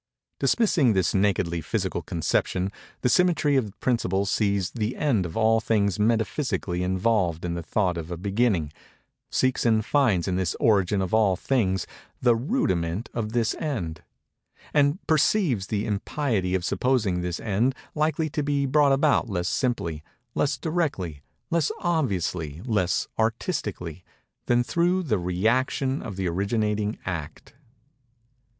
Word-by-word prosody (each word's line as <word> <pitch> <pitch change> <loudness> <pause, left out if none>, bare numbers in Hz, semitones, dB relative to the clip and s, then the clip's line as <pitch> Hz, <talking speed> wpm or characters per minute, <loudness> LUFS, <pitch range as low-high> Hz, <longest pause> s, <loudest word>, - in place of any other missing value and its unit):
Dismissing 175 - +3
this 95 -3 +1
nakedly 95 -4 +1
physical - - -2
conception, 95 +1 -1 0.3
the - - +2
symmetry 160 -1 +3
of 110 -7 -1
principle 100 -6 0
sees 100 -2 0
the 115 0 -2
end 115 -12 +1
of 80 - -7
all 115 0 +4
things 105 -4 +1
metaphysically 110 - 0
involved 90 -2 +1
in 85 - -2
the 85 - -3
thought 90 0 0
of 80 0 -7
a 85 - -4
beginning; 100 -5 0 0.6
seeks 130 -1 +1
and 110 -2 +2
finds 115 - +2
in 90 -1 0
this 95 -3 -1
origin 100 -2 +3
of 95 - -4
all 105 -4 +4
things 95 - 0 0.3
the 120 -2 +4
rudiment 110 - -1
of 110 -2 -3
this 120 -1 +1
end; 90 - -3 0.7
and 145 +1 +3
perceives 150 - +2
the 105 0 -1
impiety 105 -3 -1
of 90 -1 -1
supposing 110 -10 +1
this 90 -1 -3
end 115 +5 0 0.2
likely 155 +1 0
to 150 0 -2
be 140 -1 0
brought 140 +1 +4
about 135 -3 +3
less 90 -3 -1
simply—less 120 - -2
directly—less 150 - -2
obviously—less 95 - -1
artistically—than 110 - -2
through 175 +7 +1
the 120 -10 +1
rëaction 120 +9 0
of 100 - -6
the 95 -1 -2
originating 105 +3 -1
Act. 85 -6 -6
110 Hz, 130 wpm, -25 LUFS, 90-130 Hz, 0.7 s, all